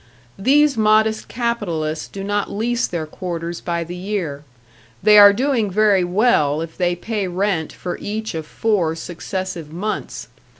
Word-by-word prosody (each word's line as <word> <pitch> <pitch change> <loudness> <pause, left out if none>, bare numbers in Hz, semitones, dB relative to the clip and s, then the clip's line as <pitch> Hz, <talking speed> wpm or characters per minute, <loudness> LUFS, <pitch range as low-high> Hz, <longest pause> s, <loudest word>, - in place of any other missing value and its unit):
These 280 +5 +4
modest 220 0 +3
capitalists 175 -11 -2
do 195 - -7
not 205 0 -1
lease 240 +4 -1
their 165 -3 -3
quarters 170 +1 -5
by 170 -1 -2
the 175 +2 -7
year. 180 -7 -4 0.6
They 210 -1 +8
are 205 0 +10
doing 240 -1 0
very 200 -1 +3
well 175 -6 +2
if 165 0 -7
they 175 -1 0
pay 205 +2 -3
rent 180 -3 -1
for 180 - -6
each 220 +1 -4
of 160 -1 -5
four 185 -7 0
successive 175 -1 -5
months. 200 +6 -4
195 Hz, 145 wpm, -20 LUFS, 170-215 Hz, 0.6 s, are